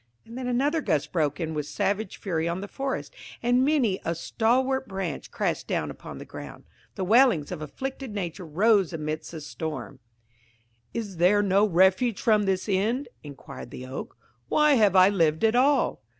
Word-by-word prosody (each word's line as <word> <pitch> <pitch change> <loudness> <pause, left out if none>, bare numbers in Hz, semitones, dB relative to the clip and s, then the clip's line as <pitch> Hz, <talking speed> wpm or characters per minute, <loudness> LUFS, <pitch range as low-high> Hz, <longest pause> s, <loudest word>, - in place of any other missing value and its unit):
And 230 - -11
then 255 0 -4
another 280 +6 +1
gust 150 - 0
broke 150 -3 0
in 160 -2 -3
with 150 -2 -3
savage 200 +3 -2
fury 165 -4 -2
on 170 +2 -2
the 200 - -6
forest, 270 +5 -4 0.3
and 245 +2 +3
many 265 -9 +2
a 165 - -1
stalwart 255 +9 0
branch 190 -6 -4
crashed - - -2
down - - -1
upon - - -10
the - - -9
ground. - - -10 0.3
The 190 - -3
wailings 215 - +4
of 175 -4 -5
afflicted 265 - -6
nature 185 -3 -4
rose 195 +2 +3
amidst 155 0 -4
the 160 -2 -8
storm. 150 -6 -6 0.9
"Is 205 -6 -5
there 195 +5 +4
no 200 +2 +3
refuge 190 +5 +3
from 215 -3 +3
this 190 0 0
end?" 215 +8 0
inquired 140 -4 -10
the 130 -1 -8
Oak. 130 +1 -7 0.3
"Why 300 -1 +4
have 210 -7 +4
I 185 0 +8
lived 165 -4 +1
at 225 0 +4
all?" 275 +3 +3
195 Hz, 175 wpm, -26 LUFS, 165-240 Hz, 0.9 s, I